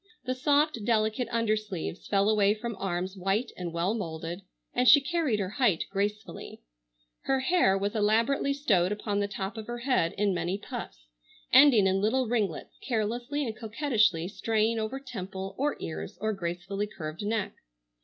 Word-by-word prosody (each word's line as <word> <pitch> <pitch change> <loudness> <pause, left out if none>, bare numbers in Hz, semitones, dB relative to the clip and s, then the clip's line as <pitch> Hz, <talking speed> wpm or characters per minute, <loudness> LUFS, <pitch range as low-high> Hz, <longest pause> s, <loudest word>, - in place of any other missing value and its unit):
The 255 - 0
soft 285 -2 +2
delicate 220 +2 +1
undersleeves 215 -7 -2
fell 200 0 +2
away 210 -1 +3
from 230 +1 -5
arms 185 0 -2
white 195 +6 -1
and 175 -2 -5
well 170 +5 0
moulded, 170 -3 -5 0.3
and 250 +1 +2
she 285 - +9
carried 275 -5 0
her 190 -2 -2
height 200 -10 +3
gracefully. 205 +2 -4 0.6
Her 270 -1 +1
hair 265 - +3
was 200 +1 -1
elaborately 225 +7 +2
stowed 205 -11 +2
upon 210 -1 -2
the 205 - 0
top 200 +2 -5
of 220 - -6
her 240 0 -4
head 240 -9 +1
in 205 -1 +1
many 175 +2 -1
puffs, - - -8 0.5
ending 260 -6 +7
in 190 0 +2
little 255 +5 +2
ringlets 215 -8 -2
carelessly 240 +5 -2
and 225 -3 -4
coquettishly 215 - +1
straying 220 +2 0
over 220 +5 -3
temple, 195 -7 -6
or 285 +5 -1
ears, 80 0 -6
or 215 +2 0
gracefully 185 +2 -3
curved 155 -4 -7
neck. 210 -1 -1
210 Hz, 160 wpm, -28 LUFS, 190-240 Hz, 0.6 s, she